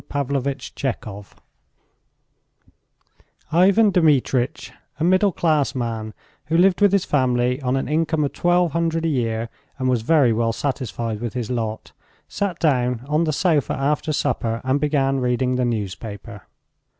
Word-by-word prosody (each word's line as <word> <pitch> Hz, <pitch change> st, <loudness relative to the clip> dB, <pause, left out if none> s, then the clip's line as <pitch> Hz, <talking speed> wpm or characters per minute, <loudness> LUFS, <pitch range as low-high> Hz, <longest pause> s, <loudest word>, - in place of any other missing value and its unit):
THE -, -, -4 dB
LOTTERY 140 Hz, 0 st, -1 dB
TICKET 110 Hz, -7 st, -6 dB, 2.2 s
IVAN 195 Hz, +6 st, +4 dB
DMITRITCH, 140 Hz, -7 st, +1 dB, 0.3 s
a -, -, -1 dB
middle 185 Hz, +3 st, +3 dB
class 155 Hz, -6 st, +1 dB
man 115 Hz, -3 st, -4 dB, 0.3 s
who 165 Hz, +2 st, 0 dB
lived 185 Hz, +2 st, +3 dB
with 205 Hz, -2 st, +5 dB
his 200 Hz, -2 st, +2 dB
family 125 Hz, -1 st, +1 dB
on 130 Hz, 0 st, 0 dB
an 135 Hz, -, -2 dB
income 160 Hz, +1 st, 0 dB
of 140 Hz, -, -2 dB
twelve 175 Hz, -1 st, +2 dB
hundred 165 Hz, 0 st, -1 dB
a -, -, +2 dB
year 115 Hz, -5 st, -1 dB, 0.3 s
and 130 Hz, -2 st, -1 dB
was 125 Hz, -3 st, +1 dB
very 135 Hz, -2 st, +3 dB
well 115 Hz, 0 st, 0 dB
satisfied 115 Hz, -5 st, -3 dB
with 120 Hz, -4 st, -4 dB
his 125 Hz, -1 st, -3 dB
lot, 110 Hz, -3 st, -4 dB, 0.4 s
sat 200 Hz, -4 st, -3 dB
down 125 Hz, -6 st, +1 dB
on 150 Hz, +3 st, +1 dB
the 155 Hz, -, 0 dB
sofa 155 Hz, -2 st, +1 dB
after 150 Hz, +3 st, -1 dB
supper 120 Hz, -6 st, -1 dB
and 130 Hz, +2 st, +1 dB
began 135 Hz, -2 st, +1 dB
reading 125 Hz, 0 st, 0 dB
the 125 Hz, 0 st, 0 dB
newspaper. 105 Hz, -1 st, -5 dB
135 Hz, 150 wpm, -22 LUFS, 120-160 Hz, 2.2 s, with